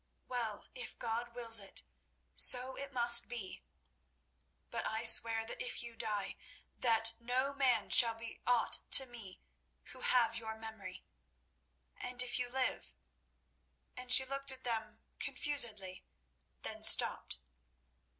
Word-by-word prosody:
Well, 230 -4 -6
if 250 -1 -9
God 235 +1 -6
wills 230 -2 +4
it, 195 -1 -7 0.5
so 255 +1 +3
it 280 0 -9
must 240 -2 +3
be. 230 -6 -9 1.1
But - - -5
I 220 +1 -5
swear 225 0 +7
that 235 - -8
if 485 - -4
you 235 -1 -11
die, 210 -3 -6 0.4
that 225 -1 +2
no 255 +4 -4
man 260 -5 -1
shall 230 -2 +6
be 230 0 -11
aught 245 -2 0
to 265 - +10
me 230 -7 -12 0.5
who - - -14
have 235 -2 +1
your 220 -1 -8
memory, 220 0 -11 0.9
and 250 0 -1
if 250 0 -3
you 245 0 -5
live—" 260 0 -5 1.0
And 250 0 -10
she 265 +1 +5
looked 275 +1 -2
at 260 0 -10
them 225 -2 -6 0.2
confusedly, 215 -10 -2 0.6
then - - -8
stopped. - - +4
235 Hz, 130 wpm, -32 LUFS, 225-250 Hz, 1.1 s, to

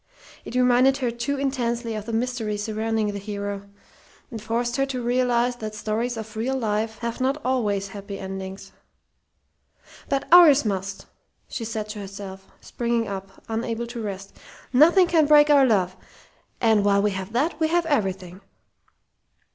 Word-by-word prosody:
It - - -7
reminded 250 +2 +4
her 250 -3 -1
too 240 +4 -3
intensely 240 -4 -1
of 215 0 -6
the - - -3
mystery 225 -2 -2
surrounding 220 0 -1
the 200 - -5
hero, 200 0 -5 0.6
and 225 -3 -6
forced 235 +3 -1
her 270 - +2
to 260 -2 -3
realize 245 0 +1
that 215 -2 -6
stories 225 +3 -2
of 220 -1 -7
real 255 +5 -1
life 220 -1 -1
have 235 +2 -3
not 270 +3 +1
always 205 -6 0
happy 200 0 -7
endings. 195 0 -7 1.4
"But 275 0 -1
ours 310 -7 +8
must!" 195 -1 -3 0.4
she 235 - -5
said 220 -1 -4
to 210 0 -6
herself, 195 -1 -8
springing 235 -1 -2
up, 195 -1 -8
unable 230 +1 -2
to 235 0 -7
rest. 195 -2 -6 0.4
"Nothing 335 +8 +6
can 325 -3 +3
break 295 0 +6
our 275 -2 +6
love; 185 -5 +1 0.6
and 220 -3 +3
while 200 0 +3
we 210 - +2
have 190 +1 -5
that 300 +6 0
we 320 - +2
have 340 +1 +1
everything!" 190 - -2
225 Hz, 155 wpm, -24 LUFS, 200-255 Hz, 1.4 s, ours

